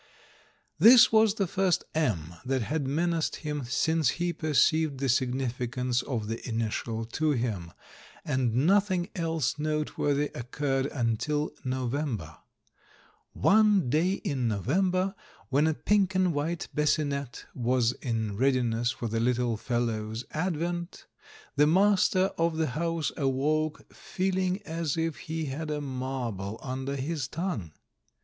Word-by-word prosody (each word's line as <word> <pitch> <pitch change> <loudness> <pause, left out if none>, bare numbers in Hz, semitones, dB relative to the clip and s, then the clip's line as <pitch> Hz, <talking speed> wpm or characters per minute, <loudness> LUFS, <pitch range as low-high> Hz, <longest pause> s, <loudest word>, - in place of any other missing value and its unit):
This 240 +6 +8
was 220 -1 +4
the 200 - +1
first 185 0 +1
M 95 - -1
that 130 -1 0
had 145 +3 -2
menaced 165 +3 0
him 150 -3 -4
since 160 +3 +1
he 175 0 0
perceived 155 -1 +2
the 135 - 0
significance 125 0 0
of 115 -6 -3
the 115 +1 -4
initial 115 0 -2
to 150 +6 0
him, 110 -10 -2 0.5
and 130 -2 +1
nothing 190 -1 +2
else 165 - -1
noteworthy 150 -1 0
occurred 135 +2 -1
until 140 +5 -1
November. 125 - -2 1.0
One 205 - +4
day 170 +6 +2
in 140 - -2
November 185 - +1 0.4
when 145 +3 +3
a 160 - +1
pink 200 0 +1
and 185 -2 +2
white 155 +4 -2
bassinette 145 -3 -1
was 120 -1 +1
in 110 -5 -3
readiness 120 -2 +1
for 120 - -3
the 115 +1 -1
little 120 0 +1
"fellow's" 115 0 -2
advent, 170 +1 -3 0.5
the 145 +1 +5
master 190 +1 +3
of 165 -1 +1
the 160 -3 +1
house 165 +3 -1
awoke 150 +3 -1
feeling 185 +1 -1
as 165 -3 -2
if 165 -2 -1
he 160 0 -4
had 150 +3 -4
a 150 -1 -1
marble 125 -7 -4
under 135 +1 -3
his 140 0 -3
tongue. 155 - -4
145 Hz, 125 wpm, -28 LUFS, 125-165 Hz, 1.0 s, This